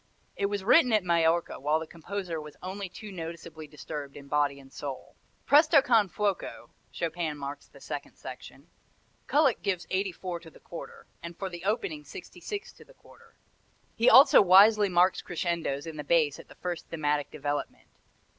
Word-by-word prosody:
It 200 - 0
was 200 -1 -3
written 250 - +5
at 215 -3 +3
Majorca 170 -1 +1
while 150 +3 +1
the 160 - -6
composer 170 0 -5
was 150 -1 -12
only 190 +1 -5
too 210 +3 -10
noticeably 165 -3 -8
disturbed 145 -1 -8
in 140 -1 -12
body 145 -1 +1
and 135 -1 -17
soul. 135 -3 -7 0.3
Presto 300 +1 +6
con 225 -5 +3
fuoco 205 0 -3 0.2
Chopin 165 -2 -3
marks 140 0 -7
the - - -17
second - - -7
section. - - -11 0.6
Kullak 285 -4 +3
gives 190 -4 -2
84 185 -2 -2
to 165 -1 -13
the - - -18
quarter, 170 - -10 0.2
and 170 0 -8
for 195 - -4
the 175 -1 -9
opening 300 - -1
66 415 +8 -8
to - - -16
the - - -21
quarter. 465 -1 -20 0.6
He 235 +2 +4
also 270 - +8
wisely 205 +2 +6
marks 180 +1 +3
crescendos 170 -5 -2
in 160 -2 -7
the 150 - -4
bass 155 -2 +2
at - - -13
the - - -15
first 175 -2 -5
thematic 150 -2 -1
development. 145 +1 -4
175 Hz, 170 wpm, -28 LUFS, 155-205 Hz, 0.6 s, also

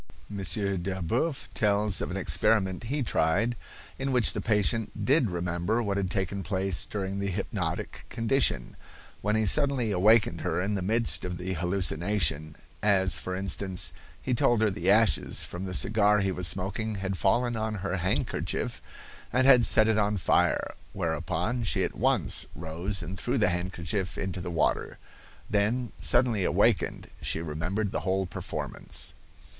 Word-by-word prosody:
M. 100 - -5 0.4
Delboeuf 95 - -2
tells 105 -1 +2
of 75 - -3
an 90 - -4
experiment 95 +1 +1
he 140 +4 -1
tried, 110 +4 +1 0.4
in 135 0 -1
which 125 -4 +3
the - - -3
patient 110 0 0
did 135 -4 +3
remember 90 +6 -1
what 100 -2 -1
had 95 -2 -1
taken 95 +2 -2
place 95 -2 0
during 100 -1 -4
the 100 - -2
hypnotic 90 - -4
condition, 120 +4 +1 0.5
when 105 +1 0
he 110 0 +2
suddenly 135 -2 +2
awakened 100 -3 +3
her - - -1
in 100 +3 -1
the 100 - -1
midst 110 +5 +1
of 90 -1 -4
the 95 +1 -3
hallucination; 90 -3 0 0.3
as, 95 -3 +3
for 95 - -4
instance, 95 -2 -1 0.3
he 130 - -2
told 120 -1 +3
her 110 - +3
the 95 0 -1
ashes 110 +1 +3
from 90 +2 -5
the 95 - -5
cigar 105 +1 +3
he 95 -1 0
was 90 -1 +1
smoking 100 +4 0
had 95 0 -3
fallen 120 +6 +2
on 110 -1 -2
her 95 0 -1
handkerchief 90 +1 -2 0.5
and 130 +2 +2
had 125 -4 +7
set 110 - +4
it 110 -1 +2
on 105 0 +1
fire, 90 - +1 0.2
whereupon 85 +6 -2
she 110 - 0
at - - -2
once - - +1
rose 85 +4 -3
and 95 +3 -6
threw 125 +5 -1
the 105 -6 +3
handkerchief 90 +1 -3
into 95 -1 -4
the 90 - -5
water. 85 -2 0 0.5
Then, 110 +4 0
suddenly 120 -5 +2
awakened, - - +1
she - - 0
remembered 85 +6 -3
the - - -1
whole 95 +1 0
performance. - - -6
100 Hz, 160 wpm, -28 LUFS, 90-110 Hz, 0.5 s, had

